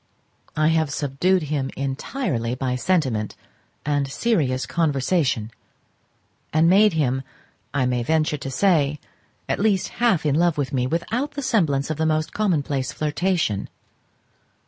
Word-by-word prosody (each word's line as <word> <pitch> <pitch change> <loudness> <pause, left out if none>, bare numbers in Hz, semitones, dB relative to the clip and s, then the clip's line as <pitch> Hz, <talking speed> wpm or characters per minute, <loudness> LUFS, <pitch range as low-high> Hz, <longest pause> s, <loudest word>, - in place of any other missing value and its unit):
I 155 0 +4
have 160 -2 +2
subdued 150 +6 +1
him 140 -3 -2
entirely 135 - -2
by 130 -1 -1
sentiment 125 -8 0 0.5
and 145 -2 0
serious 140 - 0
conversation, 140 - 0 1.0
and 160 +2 +4
made 200 +2 +5
him, 135 -4 +1 0.5
I 135 -3 +1
may 125 -1 0
venture 155 +3 +1
to 135 -1 -6
say, 150 -2 +2 0.5
at - - -1
least 200 -2 +1
half 215 -10 +3
in 145 - +2
love 170 +1 +2
with 140 -1 -2
me, 125 -1 +1
without 230 - -2
the 285 -1 -4
semblance 155 - +1
of 155 - -3
the 160 0 +1
most 155 0 0
commonplace 145 -10 0
flirtation. 155 - -1
150 Hz, 135 wpm, -23 LUFS, 135-175 Hz, 1.0 s, made